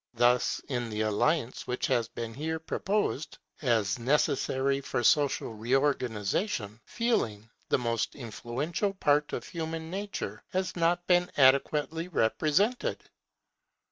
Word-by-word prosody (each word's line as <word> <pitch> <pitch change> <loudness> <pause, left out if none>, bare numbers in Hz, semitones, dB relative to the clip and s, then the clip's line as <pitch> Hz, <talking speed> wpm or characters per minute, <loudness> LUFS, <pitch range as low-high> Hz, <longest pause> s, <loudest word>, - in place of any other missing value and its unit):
Thus, 120 +1 +3
in 120 -3 -2
the 105 0 -2
alliance 115 +5 0
which 125 - -1
has 120 -4 +1
been 115 0 -6
here 160 +5 -2
proposed 175 -1 -2 0.2
as 115 -6 +1
necessary 135 +1 +1
for 120 - -2
social 145 -3 +2
reorganization, 115 - 0
Feeling, 115 - -1 0.2
the - - +4
most 115 -2 -1
influential 140 - -3
part 150 -4 +2
of - - -4
human 165 -1 -5
nature, 200 +1 -5
has 185 0 -1
not 175 +1 +1
been 180 0 +3
adequately 150 +4 +3
represented. 160 - +1
140 Hz, 115 wpm, -29 LUFS, 115-165 Hz, 0.2 s, the